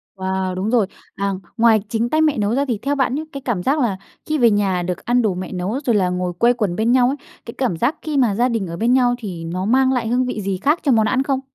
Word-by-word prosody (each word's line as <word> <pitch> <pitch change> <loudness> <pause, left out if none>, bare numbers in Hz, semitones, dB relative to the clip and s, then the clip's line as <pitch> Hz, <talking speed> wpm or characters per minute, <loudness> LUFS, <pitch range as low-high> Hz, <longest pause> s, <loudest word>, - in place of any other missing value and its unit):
Wow, 190 -1 -2
đúng 190 +3 -2
rồi. 225 -5 +2 0.3
À, 200 0 -1 0.2
ngoài 225 -2 +4
chính 230 +2 -1
tay 310 0 +2
mẹ 305 -5 +2
nấu 210 +3 0
ra 280 +1 +1
thì 235 -4 -1
theo 285 +1 0
bạn 265 -1 0
nhá, 310 - -3
cái 275 - -7
cảm 220 -9 -2
giác 290 +3 +1
là 220 -7 0 0.3
khi 310 0 -1
về 235 -4 +4
nhà 195 -3 +1
được 180 0 -4
ăn 245 +1 +2
đồ 215 -4 +1
mẹ 180 0 -6
nấu 190 +9 -2
rồi 235 -4 +2
là 185 -3 +2
ngồi 180 0 -2
quây 235 +8 +3
quần 210 -7 -2
bên 225 +4 +1
nhau 250 -1 +4
ấy, 275 - 0 0.3
cái 230 - -8
cảm 240 -11 -1
giác 245 - +1
khi 300 -3 -3
mà 230 -7 +3
gia 245 +3 +2
đình 220 -6 -2
ở 170 0 -6
bên 235 +3 +2
nhau 245 -2 +3
thì 180 -8 -6
nó 180 +3 -3
mang 260 +3 +3
lại 235 -3 -1
hương 250 +2 +1
vị 245 -4 -3
gì 195 -1 -2
khác 295 - +1
cho 280 - +2
món 220 -2 +4
ăn 255 +3 +1
không? 270 -1 0
230 Hz, 290 wpm, -20 LUFS, 190-255 Hz, 0.3 s, ngoài